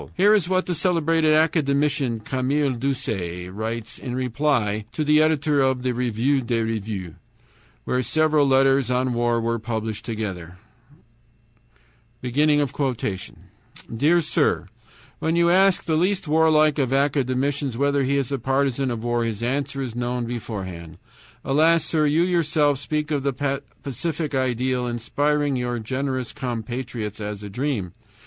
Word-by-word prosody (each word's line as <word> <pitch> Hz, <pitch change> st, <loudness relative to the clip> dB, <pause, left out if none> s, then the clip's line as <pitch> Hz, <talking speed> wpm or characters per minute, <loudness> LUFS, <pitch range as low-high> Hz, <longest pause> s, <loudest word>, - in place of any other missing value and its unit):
Here 205 Hz, +3 st, +5 dB
is 190 Hz, -5 st, +2 dB
what 185 Hz, 0 st, +1 dB
the 180 Hz, -, -1 dB
celebrated 165 Hz, -2 st, +2 dB
academician 145 Hz, -5 st, +1 dB
Camille 135 Hz, +4 st, 0 dB
Doucet 110 Hz, -9 st, -3 dB
writes 110 Hz, +2 st, -4 dB
in 125 Hz, -2 st, -5 dB
reply 125 Hz, -5 st, 0 dB
to 155 Hz, -, -1 dB
the 150 Hz, +1 st, +4 dB
editor 150 Hz, -2 st, +2 dB
of 130 Hz, -1 st, +1 dB
the 130 Hz, -, +1 dB
REVUE 125 Hz, +3 st, 0 dB
DES 115 Hz, -2 st, -1 dB
REVUES, 105 Hz, -6 st, -4 dB, 0.7 s
where 125 Hz, -, 0 dB
several 155 Hz, +1 st, +2 dB
letters 135 Hz, -1 st, +3 dB
on 125 Hz, 0 st, +1 dB
war 120 Hz, 0 st, +1 dB
were 115 Hz, 0 st, -1 dB
published 110 Hz, -1 st, -4 dB
together: 95 Hz, -6 st, -5 dB, 1.7 s
"Dear 140 Hz, -, -1 dB
Sir: 155 Hz, -, +1 dB, 0.5 s
When 160 Hz, +1 st, 0 dB
you 170 Hz, 0 st, +4 dB
ask 190 Hz, +1 st, +4 dB
the 160 Hz, -, 0 dB
least 180 Hz, +2 st, +1 dB
warlike 155 Hz, -1 st, +4 dB
of 130 Hz, -3 st, 0 dB
academicians 135 Hz, -1 st, 0 dB
whether 140 Hz, +1 st, +2 dB
he 140 Hz, +2 st, +1 dB
is 140 Hz, -1 st, -1 dB
a 140 Hz, -, -1 dB
partisan 135 Hz, +1 st, 0 dB
of 115 Hz, -2 st, -4 dB
war, 120 Hz, 0 st, 0 dB
his 115 Hz, -1 st, -3 dB
answer 135 Hz, +2 st, -2 dB
is 125 Hz, -4 st, -5 dB
known 120 Hz, 0 st, -2 dB
beforehand. 95 Hz, -8 st, -6 dB, 0.5 s
"Alas! 160 Hz, +4 st, +3 dB
sir, 155 Hz, -2 st, +1 dB
you 155 Hz, +3 st, +3 dB
yourself 155 Hz, -5 st, +2 dB
speak 150 Hz, +1 st, -2 dB
of 145 Hz, -2 st, 0 dB
the 140 Hz, 0 st, -1 dB, 0.2 s
pacific 150 Hz, +3 st, -3 dB
ideal 130 Hz, -1 st, 0 dB
inspiring 145 Hz, +5 st, 0 dB
your 120 Hz, -1 st, -2 dB
generous 130 Hz, +2 st, -3 dB
compatriots 120 Hz, -3 st, -4 dB
as 105 Hz, 0 st, -5 dB
a 105 Hz, -, -6 dB
dream. 120 Hz, -, -2 dB
130 Hz, 140 wpm, -23 LUFS, 115-150 Hz, 1.7 s, Here